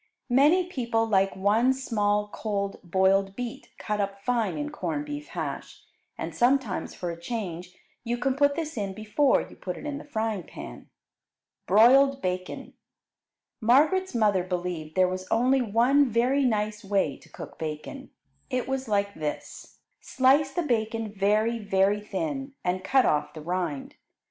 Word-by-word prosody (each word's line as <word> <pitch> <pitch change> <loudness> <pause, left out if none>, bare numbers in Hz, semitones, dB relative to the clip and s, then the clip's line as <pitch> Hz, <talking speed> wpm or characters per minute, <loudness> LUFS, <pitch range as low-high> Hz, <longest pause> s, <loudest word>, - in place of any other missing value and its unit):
Many 300 +8 +5
people 235 -9 -1
like 195 -3 +2
one 215 +7 +3
small 210 -5 0
cold 200 -2 -3
boiled 190 +2 +2
beet 245 -2 -6
cut 210 -1 -2
up 200 0 -3
fine 230 -4 0
in 295 0 -3
corned 295 0 -3
beef 295 0 -6
hash, - - -6 0.3
and - - -5
sometimes 245 -5 +1
for 175 -1 -4
a 170 0 -9
change 180 -4 -5 0.3
you 240 0 -2
can 260 +2 0
put 285 0 +3
this 315 -4 -4
in 195 -2 -3
before 220 +7 +2
you - - -14
put 180 -2 -6
it - - -9
in 290 -1 -4
the - - -10
frying 220 -7 -2
pan. 60 - -10 0.8
Broiled 265 +8 +6
Bacon 185 -4 -4 0.9
Margaret's 300 +10 +3
mother 205 -5 +3
believed 175 -4 -4
there 185 -1 +4
was 185 0 -4
only 255 +3 +3
one 250 +5 +3
very 250 +5 +2
nice 215 -2 -1
way 195 -8 0
to - - -20
cook - - -10
bacon. 160 - -6 0.4
It 255 -2 -2
was 265 -1 -2
like 200 -1 0
this: 150 -4 -6 0.2
Slice 275 +2 +3
the 350 +5 -1
bacon 225 -4 -1
very, 215 +3 +1
very 200 0 +1
thin, 275 +4 -4
and 185 +1 -1
cut 265 +5 +3
off 150 +2 0
the 155 - -7
rind. 170 -5 -3
220 Hz, 155 wpm, -27 LUFS, 195-265 Hz, 0.9 s, Broiled